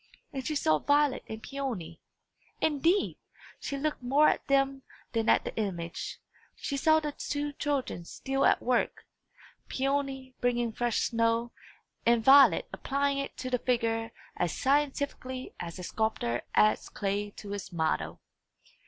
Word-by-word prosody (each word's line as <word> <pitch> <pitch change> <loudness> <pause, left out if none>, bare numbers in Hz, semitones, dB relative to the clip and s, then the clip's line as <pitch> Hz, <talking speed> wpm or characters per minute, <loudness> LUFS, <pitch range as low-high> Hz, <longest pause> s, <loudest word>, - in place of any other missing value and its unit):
And 265 -1 -3
she 310 - -1
saw 155 - +3
Violet 290 - +2
and 220 0 -7
Peony 230 -13 -5 0.6
indeed, 325 +6 +2 0.4
she 280 - -4
looked 300 0 -2
more 275 +5 +5
at - - -2
them 275 0 +2 0.3
than 225 -1 0
at - - +5
the - - -5
image 175 -6 -3 0.4
she 280 - -4
saw 315 +3 +4
the 300 -1 -3
two 290 0 -3
children 280 - -2
still 270 +9 -2
at - - +4
work; 245 -1 0 0.6
Peony 270 -1 -1
bringing 240 -1 +1
fresh 240 0 0
snow, 230 0 +1 0.5
and 235 -1 +3
Violet 270 -8 +7
applying 280 0 0
it 275 - -5
to 255 0 -5
the 250 - +2
figure 230 -2 0 0.2
as 175 -2 -1
scientifically 275 -2 -1
as 170 0 -6
a 180 - -7
sculptor 175 - -1
adds 215 - +3
clay 205 +1 -2
to 205 - -8
his 200 -1 -5
model. 160 -2 -1
255 Hz, 145 wpm, -29 LUFS, 220-280 Hz, 0.6 s, Violet